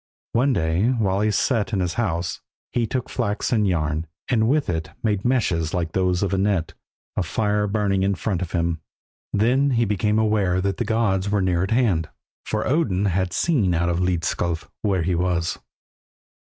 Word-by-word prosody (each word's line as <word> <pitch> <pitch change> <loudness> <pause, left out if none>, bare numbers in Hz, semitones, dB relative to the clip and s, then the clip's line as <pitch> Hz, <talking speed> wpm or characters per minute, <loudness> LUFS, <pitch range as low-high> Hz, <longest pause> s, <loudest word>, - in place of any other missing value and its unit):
One 130 +4 +3
day 85 0 +1
while 100 -6 +1
he 110 - +2
sat 115 +1 +1
in 100 - +1
his 90 -2 0
house, 85 -7 -2 0.3
he 120 -2 0
took 130 +2 -2
flax 105 -4 -2
and 110 -4 +3
yarn, 80 -2 -1 0.2
and 110 -3 +3
with 150 +1 +2
it 80 -2 -2
made 105 -3 0
meshes 95 -11 +1
like 85 -3 -1
those 90 0 +1
of 100 -1 -1
a 95 - +1
net, 95 -5 0 0.4
a - - +1
fire 105 -1 0
burning 100 -2 +1
in 100 +1 +1
front 95 -1 -2
of 90 - -4
him. 85 -2 0 0.5
Then 125 +7 +3
he 115 - +3
became 105 +1 +1
aware 105 -4 +2
that 95 0 -1
the 120 - -1
gods 105 -3 +1
were 105 0 +1
near 90 -2 +1
at 95 - -1
hand, 105 - +2 0.4
for 110 0 -1
Odin 110 - +1
had 95 -1 0
seen 110 - +1
out 85 +1 +1
of 85 0 0
Hlidskjalf 85 -2 -1
where 95 -5 +1
he 90 +2 0
was. 85 -1 0
100 Hz, 185 wpm, -23 LUFS, 90-110 Hz, 0.5 s, One